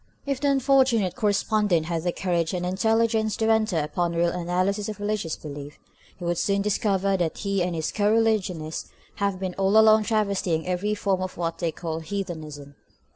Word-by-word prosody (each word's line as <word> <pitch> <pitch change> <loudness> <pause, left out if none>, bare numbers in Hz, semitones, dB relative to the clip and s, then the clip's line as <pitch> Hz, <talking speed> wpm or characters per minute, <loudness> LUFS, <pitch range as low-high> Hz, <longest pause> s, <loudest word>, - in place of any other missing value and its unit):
If 275 -2 -2
the 285 - +2
unfortunate 265 -7 +3
correspondent 210 -5 +1
had 165 0 -2
the 175 +1 0
courage 175 -2 -1
and 180 0 -2
intelligence 220 +3 +1
to 225 0 +2
enter 220 -5 +2
upon 170 +3 -1
a - - -2
real 170 0 +3
analysis 185 +4 -1
of 210 -1 -6
religious 205 -6 -2
belief, 145 -1 -9 0.4
he 175 - -7
would 170 -1 0
soon 200 0 +1
discover 195 -1 +1
that 170 -3 -1
he 200 -2 -1
and 175 -1 -1
his 160 -1 -2
co 205 0 +1
religionists 195 -8 0 0.3
have 200 -2 -1
been 190 -1 -3
all 195 +2 +3
along 220 0 +6
travestying 200 -7 0
every 185 +4 -1
form 195 -2 0
of 185 0 -5
what 165 -1 -3
they 170 -2 0
call 160 0 -4
heathenism. 160 -5 -6
190 Hz, 180 wpm, -25 LUFS, 170-215 Hz, 0.4 s, along